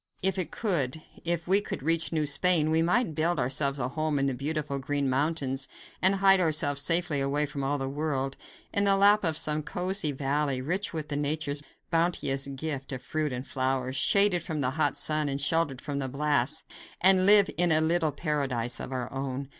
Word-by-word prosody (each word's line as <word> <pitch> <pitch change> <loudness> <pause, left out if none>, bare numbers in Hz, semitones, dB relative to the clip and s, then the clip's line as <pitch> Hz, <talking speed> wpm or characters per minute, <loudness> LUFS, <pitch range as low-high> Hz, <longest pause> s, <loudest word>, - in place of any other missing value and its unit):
If 190 0 +1
it 170 -4 -3
could 160 - -1 0.2
if 170 0 -3
we 195 +3 +4
could 205 - -7
reach 165 0 +1
New 155 -2 0
Spain, 155 +2 +2
we 160 0 +2
might 180 +2 +1
build 165 +3 0
ourselves 140 +2 0
a 125 -2 -3
home 155 +1 -2
in 135 - 0
the 135 - -1
beautiful 145 +1 -3
green 140 +1 -2
mountains 135 0 -1 0.3
and 190 +1 +5
hide 195 0 +5
ourselves 150 -4 +1
safely 165 -2 +2
away 140 +2 0
from 140 -1 -6
all 140 +2 -1
the 135 -1 -4
world, 135 -1 -3 0.4
in 200 - +2
the 195 -1 +4
lap 205 +1 +4
of 160 -3 +1
some 155 -1 +1
cosy 180 0 -1
valley, 140 0 -2
rich 180 +11 -2
with 155 -2 -6
nature's 145 0 -2 0.3
bounteous 165 -5 +1
gift 140 0 -5
of 130 -1 -6
fruit 155 +1 -3
and 125 +1 -5
flowers, 130 -1 -2
shaded 200 +4 +4
from 155 -2 -4
the 130 -1 0
hot 155 +3 0
sun 155 -1 +1
and 140 0 -3
sheltered 145 -2 0
from 145 -2 -4
the 135 -1 -3
blasts, 145 +1 +2 0.4
and 185 0 +5
live 205 -1 +6
in 175 +1 +2
a 155 - +5
little 160 0 0
paradise 140 -6 -3
all - - -7
our 125 -1 -5
own. 135 0 -5
150 Hz, 195 wpm, -27 LUFS, 135-165 Hz, 0.4 s, live